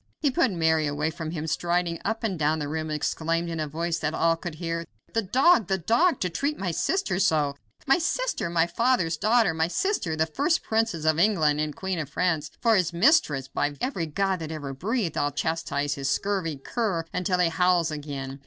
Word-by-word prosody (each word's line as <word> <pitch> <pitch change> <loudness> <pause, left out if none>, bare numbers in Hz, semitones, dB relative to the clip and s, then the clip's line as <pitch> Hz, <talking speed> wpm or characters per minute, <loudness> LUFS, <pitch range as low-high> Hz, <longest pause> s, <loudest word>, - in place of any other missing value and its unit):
He 285 - +1
put 265 -2 +2
Mary 160 -4 +1
away 150 +2 -1
from 160 -1 -6
him, 160 -2 -4
and 160 - -3
striding 170 0 0
up 225 +2 -2
and 195 -6 -1
down 155 +1 +2
the 150 -2 -3
room 155 +1 -3
exclaimed, 165 +2 -1
in 165 - -4
a 155 - -1
voice 165 +2 -2
that 155 0 -2
all 165 0 +3
could 165 -1 -7
hear, 165 0 -3 0.3
"The 225 - +2
dog! 250 - +4
the 190 0 +1
dog! 240 - +2
to 180 - +1
treat 285 - -1
my 190 -3 -2
sister 285 - 0
so. 150 -6 +2 0.3
My 270 +5 +4
sister! - - -1
My 170 -1 +2
father's 185 -3 +1
daughter! 215 +1 +3
My 160 0 +1
sister! 185 - -1
The 160 0 +2
first 285 - 0
princess 220 -8 0
of 155 0 +3
England 160 -7 +3
and 155 -1 -3
queen 190 -2 -3
of 150 -4 -4
France 160 -3 0
for 230 -2 +3
his 180 -4 +2
mistress! 170 - +3
By 145 +1 -2
every 190 -11 -2
god 190 +4 0
that 160 -1 -6
ever 145 -3 -5
breathed, 195 - -2
I'll 145 - +1
chastise 145 -1 -2
this 140 -1 -3
scurvy 185 -4 -1
cur 185 - -2
until 180 0 0
he 180 -2 +3
howls 175 -1 +2
again. 140 -2 -6
165 Hz, 210 wpm, -26 LUFS, 155-200 Hz, 0.3 s, dog